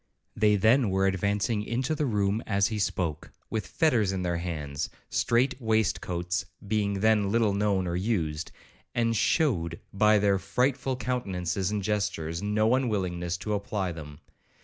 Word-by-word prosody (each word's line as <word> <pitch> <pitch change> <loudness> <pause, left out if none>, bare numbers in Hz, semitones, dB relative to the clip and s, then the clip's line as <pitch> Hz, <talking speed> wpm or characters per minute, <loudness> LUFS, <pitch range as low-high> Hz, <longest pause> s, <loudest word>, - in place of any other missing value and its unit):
They 105 -1 +4
then 110 +3 +4
were 95 0 +2
advancing 100 +3 0
into 125 +7 -1
the 150 -2 0
room 105 -1 +1
as 100 -1 +2
he 110 -2 -3
spoke, 85 -6 -2 0.2
with 110 -1 -2
fetters 120 - +2
in 95 -1 -2
their 85 -1 0
hands, 75 -4 -4 0.2
(strait 125 +3 +2
waistcoats 90 -6 0 0.2
being 100 -2 0
then 110 -2 +3
little 110 -1 +2
known 100 -2 +1
or 85 -1 -2
used), 85 -6 -1 0.4
and 115 -1 +1
shewed, 95 - +1
by 105 +2 +4
their 100 -1 +2
frightful 125 +7 0
countenances 95 -8 -2
and 105 -1 -2
gestures, 95 -6 -1
no 110 +3 +2
unwillingness 90 -9 -1
to 105 +4 -3
apply 100 -2 -2
them. 75 -3 -9
100 Hz, 150 wpm, -28 LUFS, 90-110 Hz, 0.4 s, They